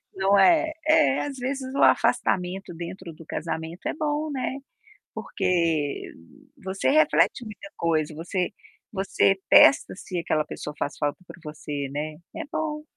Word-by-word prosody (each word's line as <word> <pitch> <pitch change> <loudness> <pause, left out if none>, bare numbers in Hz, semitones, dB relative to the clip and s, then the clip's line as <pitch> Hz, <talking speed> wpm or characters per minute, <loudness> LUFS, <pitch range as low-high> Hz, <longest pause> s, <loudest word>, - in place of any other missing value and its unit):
Não 195 +1 +3
é? 315 - +5 0.2
É, 310 -3 +4
às 280 -2 -5
vezes 260 +1 -4
o 280 - +3
afastamento 180 0 +2
dentro 170 0 -7
do 165 - -14
casamento 160 +3 -5
é - - -1
bom, 300 0 -2
né, 265 0 -3 0.5
porque 165 -5 -1 0.5
você 190 -8 -1
reflete 155 - +3
muita 205 -2 -10
coisa 160 -2 0
você 180 +3 -2 0.4
você 195 0 +2
testa 295 -1 +7
se 185 -1 -6
aquela 155 -2 0
pessoa 150 0 -7
faz 145 - -2
falta 145 -1 -1
por - - -12
você, 145 -2 -5
né, 150 +1 -4 0.2
é 325 - -5
bom. 300 -1 -3
185 Hz, 145 wpm, -25 LUFS, 155-260 Hz, 0.5 s, testa